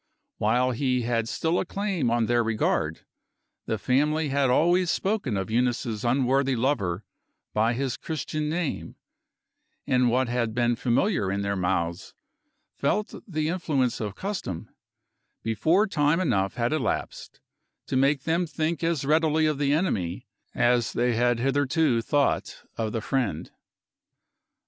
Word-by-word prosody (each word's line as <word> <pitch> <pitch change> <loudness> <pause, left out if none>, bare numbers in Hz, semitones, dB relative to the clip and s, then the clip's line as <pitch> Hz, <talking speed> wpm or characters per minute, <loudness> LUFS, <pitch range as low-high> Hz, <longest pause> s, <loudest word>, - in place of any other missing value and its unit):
While 125 +1 +2
he 125 0 0
had 115 -1 0
still 165 +2 0
a - - -1
claim 195 - -1
on 120 -1 +2
their 120 +1 +2
regard 110 -8 -1 0.6
the 110 - 0
family 150 +7 +1
had 135 -1 +2
always 175 +7 +3
spoken 190 - 0
of 95 +2 -3
Eunice's 120 -2 0
unworthy 130 +2 +2
lover 110 -7 -1 0.5
by 110 +2 +2
his 130 0 -2
Christian 155 -1 -3
name; 165 -1 -3 0.9
and 125 -1 +3
what 130 +2 +2
had 115 -2 -1
been 120 0 +2
familiar 120 - +1
in 100 0 -1
their 100 0 -1
mouths 90 -2 -2 0.6
felt 210 0 -1
the 155 -5 -1
influence 145 -9 0
of 105 -2 -4
custom, 185 - -5 0.7
before 160 - +2
time 150 -4 +1
enough 100 - 0
had 120 +3 0
elapsed 155 - -3 0.5
to - - -3
make 135 +1 +2
them 170 +2 0
think 160 +1 -2
as 165 -4 0
readily 155 +1 +3
of 155 -2 0
the 140 -1 +2
enemy 105 - -1 0.3
as 120 -1 +2
they 120 +1 +1
had 120 +1 +2
hitherto 135 0 +1
thought 145 +4 0
of 110 -2 -2
the 115 - -2
friend. 110 - -2
130 Hz, 140 wpm, -26 LUFS, 115-155 Hz, 0.9 s, always